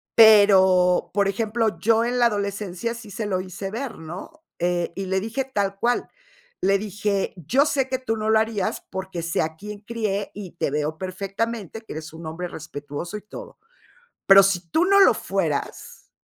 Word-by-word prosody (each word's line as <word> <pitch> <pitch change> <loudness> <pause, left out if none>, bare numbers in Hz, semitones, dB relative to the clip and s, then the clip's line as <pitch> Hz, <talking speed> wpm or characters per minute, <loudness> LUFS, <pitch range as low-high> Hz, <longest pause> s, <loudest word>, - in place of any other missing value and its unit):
Pero, 190 -5 +6
por 200 0 +2
ejemplo, 220 0 0
yo 225 +4 +3
en 245 +1 -1
la 240 - +5
adolescencia 205 0 -3
sí 220 -3 -11
se 215 +2 -4
lo 185 -2 0
hice 190 +1 -6
ver, 240 -2 -5
¿no? 185 - -9 0.2
Eh, 175 -1 0
y 195 0 -4
le 190 +1 0
dije 225 +6 -3
tal 200 -6 -2
cual. 245 +3 0 0.5
Le 195 +1 +3
dije: 205 -1 -2
"Yo 250 - +2
sé 270 -3 +1
que 260 -1 -1
tú 225 -4 -2
no 215 0 -2
lo 220 - +5
harías 220 -3 -1
porque 190 -2 -5
sé 165 +1 -1
a 160 0 -4
quién 210 +3 -9
crié 210 -3 -3
y 195 -4 -8
te 155 - -2
veo 150 +1 -2
perfectamente 195 +3 -4
que - - -9
eres 155 0 -8
un 165 +1 -10
hombre 165 +3 -5
respetuoso 150 +2 -7
y - - -10
todo. 210 - -11 0.7
Pero 195 0 +9
si 195 -3 +1
tú 330 +3 +3
no 395 +1 +5
lo 390 - +7
fueras", - - -3
200 Hz, 185 wpm, -23 LUFS, 180-225 Hz, 0.7 s, Pero